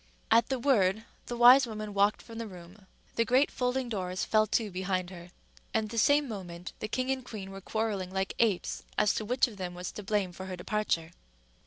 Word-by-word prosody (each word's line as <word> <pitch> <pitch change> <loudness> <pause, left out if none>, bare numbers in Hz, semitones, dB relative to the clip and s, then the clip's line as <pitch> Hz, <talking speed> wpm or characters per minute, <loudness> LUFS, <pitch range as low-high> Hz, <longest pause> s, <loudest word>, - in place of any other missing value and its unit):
At 230 - +5
the 265 - 0
word 220 -5 +2 0.2
the 240 - -4
wise 250 +2 +8
woman 215 -2 -6
walked 200 +1 +2
from 230 -1 -9
the 230 - -4
room. 185 +1 -13 0.3
The 230 - +4
great 255 +4 +3
folding 250 0 -1
doors 185 -4 -2
fell 215 0 +3
to 215 0 0
behind 185 0 -2
her; 175 -1 -10 0.5
and 220 -1 +1
the 230 +1 -1
same 285 +4 +4
moment 180 -5 -7
the 215 - -3
king 255 +4 -1
and 265 -1 -2
queen 200 -5 -7
were 195 0 -8
quarrelling 210 -3 -2
like 190 +1 -2
apes 215 -6 +1 0.2
as 210 -1 +4
to 215 - -3
which 250 +4 +2
of 220 -4 -11
them 180 -2 -5
was 180 0 -5
to - - -7
blame 200 -2 0
for 190 +2 -8
her 185 - -4
departure. 180 -3 -1
210 Hz, 210 wpm, -30 LUFS, 185-235 Hz, 0.5 s, wise